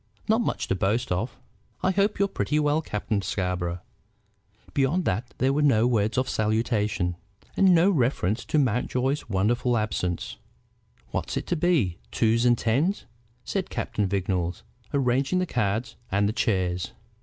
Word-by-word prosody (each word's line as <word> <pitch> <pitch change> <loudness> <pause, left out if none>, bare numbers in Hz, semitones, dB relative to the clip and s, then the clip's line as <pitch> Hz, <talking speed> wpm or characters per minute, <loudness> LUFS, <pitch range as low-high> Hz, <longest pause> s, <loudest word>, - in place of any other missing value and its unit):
"Not 220 +2 +3
much - - -2
to - - +3
boast 105 +5 0
of. 105 +8 -2 0.5
I 185 - +3
hope 200 +2 +1
you're 200 - +2
pretty 150 -5 -1
well, 150 +1 +2
Captain 105 -5 -2
Scarborough." 90 -3 -2 0.9
Beyond 145 +6 +1
that 115 +7 -1
there 135 +1 +2
was 150 +1 +1
no 120 -6 +4
word 110 -2 +1
of 130 0 +1
salutation, 105 -5 0 0.4
and 190 -2 +5
no 175 +4 +5
reference 120 - +1
to - - 0
Mountjoy's 130 +1 0
wonderful 120 +5 +1
absence. 90 -5 -2 0.7
"What's - - -2
it - - -3
to - - 0
be: 150 - +1
twos 115 +1 +2
and 120 -1 +5
tens?" 140 - 0 0.4
said 195 -2 -2
Captain 105 -2 -1
Vignolles, 90 -2 -1 0.3
arranging 135 +4 +1
the 185 - +1
cards 110 - -1
and 100 +1 +2
the 105 - -1
chairs. 95 -6 0
115 Hz, 150 wpm, -26 LUFS, 100-145 Hz, 0.9 s, and